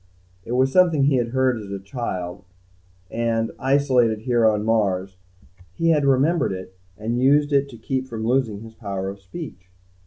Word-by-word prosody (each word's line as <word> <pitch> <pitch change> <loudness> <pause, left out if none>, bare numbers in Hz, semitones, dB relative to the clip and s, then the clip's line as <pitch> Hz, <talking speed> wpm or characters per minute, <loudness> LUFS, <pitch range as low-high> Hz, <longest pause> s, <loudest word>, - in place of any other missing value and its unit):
It 120 - -5
was 130 +1 +2
something 170 -5 +4
he 140 -1 +3
had 120 -1 0
heard 130 0 +1
as 105 -2 -9
a 100 - -4
child 95 -3 -5 0.7
and, 115 -1 0
isolated 130 -5 +2
here 120 -1 +3
on 105 -1 +1
Mars, 95 -4 0 0.6
he 165 - +2
had 150 -3 +2
remembered 140 - +2
it 95 0 -8 0.2
and 115 +3 -2
used 145 +2 +3
it 140 0 +2
to 120 - -11
keep 130 +2 -3
from 110 -3 -5
losing 115 -4 0
his 115 0 -11
power 100 -4 -4
of 100 +1 -8
speech. 95 - -9
115 Hz, 175 wpm, -23 LUFS, 105-135 Hz, 0.7 s, something